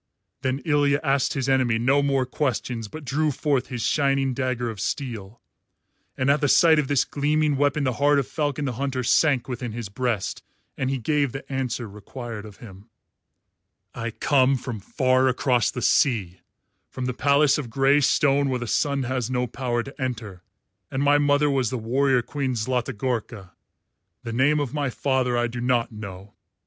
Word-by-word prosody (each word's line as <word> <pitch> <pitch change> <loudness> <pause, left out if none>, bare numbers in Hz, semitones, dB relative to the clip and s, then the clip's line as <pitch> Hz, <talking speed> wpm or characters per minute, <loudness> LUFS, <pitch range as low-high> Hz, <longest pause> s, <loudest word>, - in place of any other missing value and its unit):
Then 130 +1 -2
Ilya 145 -2 +2
asked 140 -2 +1
his 135 -3 -2
enemy 130 -4 +2
no 130 +5 +3
more 135 -2 +1
questions 125 -4 -2
but 155 +6 -9
drew 150 +4 +1
forth 140 -2 0
his 120 -4 -4
shining 135 -2 +1
dagger 125 -2 -2
of 105 - -10
steel; 115 -5 -4 0.8
and 130 - 0
at 145 - +1
the 145 - +2
sight 160 +2 +5
of 145 - 0
this 140 -1 +2
gleaming 150 +1 +1
weapon 145 +1 +1
the 130 -2 0
heart 145 0 +4
of 140 - +1
Falcon 145 -2 -2
the 135 - -1
Hunter 130 +1 -3
sank 135 0 +3
within 125 -3 -5
his 115 -3 -5
breast 115 -2 -2 0.3
and 130 - -2
he 135 - -1
gave 140 +1 0
the 135 - -7
answer 125 -3 -2
required 105 +2 -8
of 105 -2 -12
him: 100 -1 -13 1.0
"I 115 - -4
come 135 +3 +2
from 120 -3 -6
far 130 +5 +1
across 125 -1 +2
the 125 - -5
sea, 105 - +2 0.5
from 130 - -5
the 125 - -1
palace 140 +2 +3
of 130 -5 -5
grey 135 +4 +3
stone 140 0 +3
where 130 - 0
the 120 - -5
sun 140 +3 0
has 125 -1 -2
no 125 -1 0
power 120 -1 -2
to 140 +2 -11
enter, 110 -8 -4 0.5
and 135 +1 -2
my 145 +1 +4
mother 145 0 +3
was 135 -5 +1
the 130 - -3
warrior 125 +2 +1
queen 135 -2 -3
Zlatigorka. 115 -4 -3 0.7
The 115 - -5
name 140 +5 +3
of 145 -2 -3
my 145 -3 -1
father 130 -1 0
I 120 - +2
do 120 0 -5
not 120 -1 +1
know. 100 -2 -9
130 Hz, 180 wpm, -24 LUFS, 120-140 Hz, 1.0 s, sight